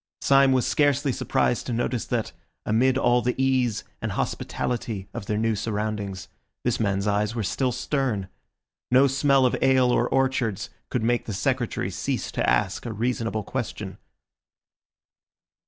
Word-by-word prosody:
Syme 135 -1 +5
was 130 -2 +2
scarcely 145 -1 +2
surprised 120 -1 0
to 125 - -2
notice 120 0 -1
that, - - -2 0.3
amid 125 +4 +3
all 120 -2 +3
the 125 +1 0
ease 130 -4 +1 0.2
and - - -2
hospitality 110 -5 -3
of 120 -4 -6
their 105 - 0
new 110 0 +1
surroundings, 105 -2 -3 0.4
this - - 0
man's 100 -2 0
eyes 105 +2 0
were 115 - -1
still 130 +6 0
stern. 125 -5 -1 0.6
No 130 +2 +6
smell 135 0 +3
of 125 - +2
ale 130 -2 +4
or 120 0 +2
orchards 130 -6 0 0.2
could 125 - -1
make 120 +1 +1
the 110 - -4
Secretary 125 +3 -1
cease - - -3
to - - 0
ask - - 0
a 115 - -4
reasonable 115 -1 -1
question. - - -5
120 Hz, 150 wpm, -25 LUFS, 110-130 Hz, 0.6 s, No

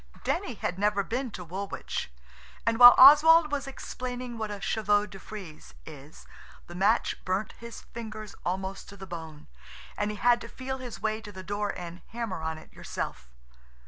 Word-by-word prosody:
Denny 345 - -1
had 180 -2 -3
never 205 0 +2
been 250 +5 -3
to 185 -4 -8
Woolwich, 190 - -5 0.5
and 230 +1 +1
while 245 0 +11
Oswald 305 +3 +8
was 280 -1 -2
explaining 250 -2 -6
what 220 -2 -4
a 205 -1 -5
chevaux 205 0 +1
de 195 -2 -11
frize 185 -7 -10
is, 150 -1 -12 0.4
the 175 - -11
match 190 +3 +1
burnt 190 +3 -1
his 235 0 -9
fingers 215 -2 -8
almost 190 +2 -4
to 200 - -11
the 190 - -9
bone, 160 -4 -8 0.5
and 205 - -1
he 210 - -5
had 240 +1 +3
to - - -7
feel 265 +2 -6
his 235 -7 -8
way 220 0 -1
to 210 -2 -10
the 190 -1 -9
door 205 +2 -2
and 175 0 -8
hammer 225 -7 -4
on 160 0 -3
it 155 - -15
yourself. - - -6
210 Hz, 175 wpm, -28 LUFS, 185-240 Hz, 0.5 s, while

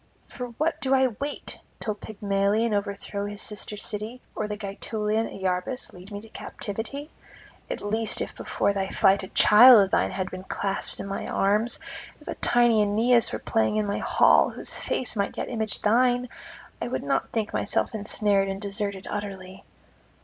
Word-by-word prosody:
For 250 -1 -6
what 320 +2 0
do 270 0 +3
I 260 -1 +4
wait? 285 +1 -5 0.2
till 215 - -2
Pygmalion 205 +1 0
overthrow 200 0 -3
his 205 0 -7
sister's 210 -1 -4
city, 215 +4 -5 0.2
or 215 - -2
Gaetulian 210 +1 -2
Iarbas 190 +7 -3
lead 185 +3 -13
me 205 - -5
to 225 - -14
captivity? 230 +10 -4 0.6
At - - -4
least 220 +2 -1
if - - -4
before 200 - -1
thy 195 -1 -2
flight 195 +1 +3
a 190 - -7
child 235 +5 +8
of 195 -1 +2
thine - - +2
had 185 -1 -4
been 185 0 -7
clasped 195 0 -2
in - - -4
my 195 0 -4
arms, 210 +4 +1 0.4
if - - -19
a - - -2
tiny 240 -2 +4
Aeneas 225 +4 +3
were 110 - -2
playing 110 - 0
in 215 -1 +1
my 200 - -2
hall, - - +4
whose - - -3
face 255 - -2
might 200 -1 -2
yet - - -3
image 220 -3 0
thine, 245 +3 +3 0.5
I - - -2
would - - -3
not - - 0
think 225 -2 -2
myself - - 0
ensnared 205 -2 +1
and 195 0 -4
deserted 200 -1 -3
utterly.' 195 -2 -6
210 Hz, 170 wpm, -26 LUFS, 200-225 Hz, 0.6 s, child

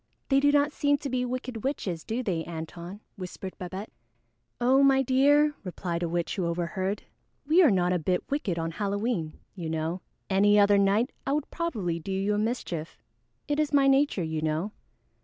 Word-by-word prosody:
"They 275 -1 +5
do 285 +1 +4
not 290 0 +3
seem 285 -1 +2
to 280 -1 -5
be 250 -1 0
wicked 250 -2 -4
witches, 190 - -2
do 235 +3 -3
they, 175 -7 -1
Antone?" 170 +4 -7 0.2
whispered 185 0 -7
Babette. 190 +3 -6 0.7
"Oh, 255 +3 +4
my 270 -1 +5
dear," 290 +4 +4
replied 175 -2 -4
a 170 - -1
witch 170 0 -1
who 180 -3 0
overheard, 180 +4 -2 0.4
"we 320 +6 +5
are 320 - +7
not 180 -3 +2
a 180 - +1
bit 180 +3 0
wicked 220 - -1
on 165 0 -2
Halloween, 200 -3 -2 0.2
you 170 -5 -5
know. 160 +3 -2 0.3
Any 205 +2 +4
other 205 0 +5
night, 200 +6 +2 0.2
I 275 - +1
would 300 0 -2
probably 210 - -2
do 180 +4 -6
you 195 +2 0
a 205 - 0
mischief. 200 -8 -3 0.5
It 295 0 0
is 300 -1 0
my 280 -1 +5
nature, 275 -7 +3
you 160 -1 -2
know." 160 +6 -1
200 Hz, 185 wpm, -27 LUFS, 175-270 Hz, 0.7 s, are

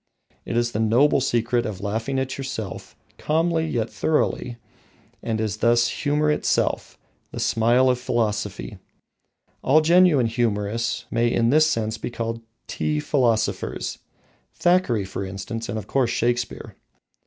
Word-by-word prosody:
It 115 - -2
is 120 0 +1
the 105 - -3
noble 120 +6 +3
secret 120 -1 +1
of 105 -4 -5
laughing 110 +6 -2
at 130 0 -2
yourself, 130 -8 -6 0.2
calmly 160 +1 +1
yet 115 -7 -1
thoroughly, 125 -4 -1 0.6
and 110 -1 -2
is 110 -2 -2
thus 120 +2 +3
humour 150 +1 0
itself, - - 0 0.3
the - - -6
smile 120 +3 +3
of 125 -1 +2
philosophy. 105 -4 -2 0.8
All 145 +4 +5
genuine 170 -5 +5
humourists 115 -1 -1
may 115 0 +1
in 115 0 +2
this 155 +2 +5
sense 110 -6 -1
be - - -4
called 115 -1 -4 0.2
tea 75 -1 -2
philosophers, 120 - 0 0.6
Thackeray, 175 - +2
for 95 +1 -5
instance, 100 +4 -6
and 105 - -3
of 105 - -5
course, 130 +1 +1
Shakespeare. 120 0 -2
120 Hz, 135 wpm, -23 LUFS, 110-135 Hz, 0.8 s, All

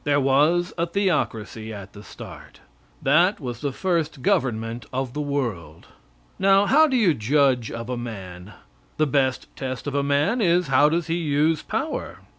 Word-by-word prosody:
There 145 -1 +2
was 150 +6 +2
a 170 - +1
theocracy 130 - -2
at 100 -3 -9
the 105 - -11
start. - - -12 0.4
That 170 +9 +3
was 120 -5 -6
the 145 -2 -1
first 160 -4 -2
government 115 -3 -1
of 130 -1 -3
the 150 - -3
world. 115 - -4 0.5
Now, 195 +1 +4
how 310 +8 +5
do 265 -3 +1
you 200 -9 +4
judge 130 0 +1
of 115 0 -6
a 125 -1 -3
man? 95 -5 -8 0.4
The 155 - +3
best 135 -2 0
test 130 -2 -5
of 145 - -3
a 140 - +1
man 145 - +1
is, 175 -4 +2
how 140 +3 +5
does 170 +1 0
he 165 +1 -1
use 155 -1 +1
power? 245 +9 -4
140 Hz, 170 wpm, -23 LUFS, 120-170 Hz, 0.5 s, how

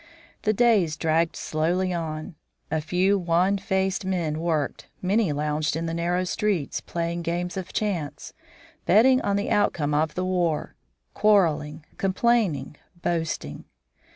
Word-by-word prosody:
The 215 - +2
days 205 -9 +3
dragged 165 +1 +1
slowly 175 +4 0
on. 160 +1 -4 0.4
A 160 - 0
few 185 +5 +2
wan 180 +3 +2
faced 190 0 0
men 170 -5 -1
worked, 160 -4 -1
many 195 -1 +1
lounged 150 +1 -1
in 165 +1 -2
the 165 - -3
narrow 175 +2 0
streets, 185 -5 -1
playing 170 0 -3
games 175 +1 -2
of 190 -2 -5
chance, 180 -9 -3 0.5
betting 255 +7 +5
on 200 - 0
the 200 - -1
outcome 150 -7 +1
of 150 +1 +1
the 185 - -1
war, 175 -4 0 0.4
quarreling, 160 -7 +2
complaining, 190 - +1 0.3
boasting. 160 - -2
175 Hz, 130 wpm, -25 LUFS, 155-190 Hz, 0.5 s, betting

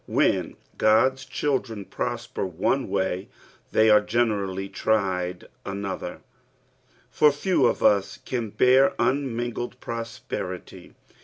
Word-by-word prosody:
Ifften - - +1 0.3
(rod*a 110 +5 +5
children 130 -6 -2
prosper 120 +4 -4
one 95 +9 0
loay, 95 0 -1 0.4
Ikty 110 0 +5
are 105 - +6
generaliy 100 -4 -1
tried 90 -4 -1 0.2
anofAer, 100 -2 -5 0.9
for 150 -1 +5
fete 145 +2 +1
of 120 - +1
us 100 -1 +3
can 120 -4 -4
bear 130 +5 +4
un 130 0 0
nin^ied 120 +1 -4
prosperity. 115 -6 -6
115 Hz, 105 wpm, -25 LUFS, 100-125 Hz, 0.9 s, are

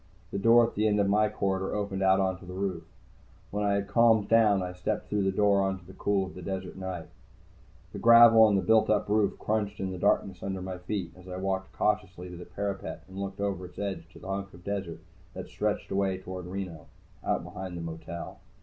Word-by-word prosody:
The 100 - -2
door 115 +3 +6
at 115 - -5
the 110 +1 +1
end 105 -1 +2
of 100 - +3
my 105 +2 +3
corridor 95 -1 -1
opened 100 -2 -2
out 95 0 +4
onto 95 -1 -1
the 90 0 -8
roof. 95 -3 -2 0.7
When 105 +1 -1
I 100 -1 +2
had 100 0 -1
calmed 110 -1 +4
down, 105 -4 +4
I 90 0 -5
stepped 90 +4 -3
through 105 -1 +1
the 95 0 +2
door 100 0 +3
into 95 -2 -6
the 95 - -12
cool 100 0 0
of 95 - -10
the 90 - -9
desert 95 +1 -5
night. 95 -3 -5 0.9
The - - -5
gravel 115 -1 +8
on 110 -2 +6
the 95 - +1
built 110 +3 +4
up 105 - +2
roof 105 -1 +2
crunched 105 -1 -2
in 95 -1 -2
the 90 - -6
darkness 95 -2 +1
under 95 -1 -3
my 95 -1 -5
feet 90 0 -4
as 90 0 -15
I 90 0 -6
walked 95 0 -2
cautiously 95 -4 -1
to - - -8
the 90 0 -9
parapet 100 +2 -5
and 95 +1 -9
looked 100 0 -5
over 100 -3 -2
its 90 - -19
edge 95 -5 -4
to - - -13
the - - -11
hunk 100 0 -3
of 85 - -15
desert 95 -4 -4 0.3
that - - -7
stretched - - -2
away 95 -1 +1
toward 95 -1 -7
Reno, 90 -4 -6 0.4
out - - 0
behind 95 -1 -7
the - - -5
motel. 80 +1 -7
95 Hz, 225 wpm, -29 LUFS, 95-100 Hz, 0.9 s, gravel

